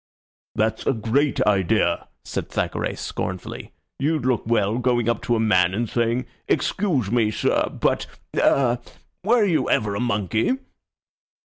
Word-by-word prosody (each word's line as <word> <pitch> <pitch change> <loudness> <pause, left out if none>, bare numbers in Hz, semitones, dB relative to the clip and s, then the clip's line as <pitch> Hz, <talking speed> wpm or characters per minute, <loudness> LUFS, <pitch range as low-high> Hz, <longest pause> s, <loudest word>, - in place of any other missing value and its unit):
"That's 110 +1 0
a - - +4
great 130 +6 +1
idea," 100 -2 +2 0.2
said - - -4
Thackeray, - - -2
scornfully. 95 0 -5 0.3
"You'd 150 -1 0
look 125 -4 0
well 110 0 +1
going 120 -2 +1
up 120 - +1
to 120 - +2
a - - 0
man 95 -4 +3
and 115 +2 -1
saying, 120 +2 0 0.2
'Excuse 145 - 0
me, 115 -3 +3
sir, 110 - +1
but - - 0 0.3
ah 125 -3 +3 0.4
were 220 +2 +4
you 175 -5 +1
ever 105 -2 +1
a 100 - -2
monkey?'" 110 - +1
115 Hz, 140 wpm, -23 LUFS, 105-130 Hz, 0.4 s, a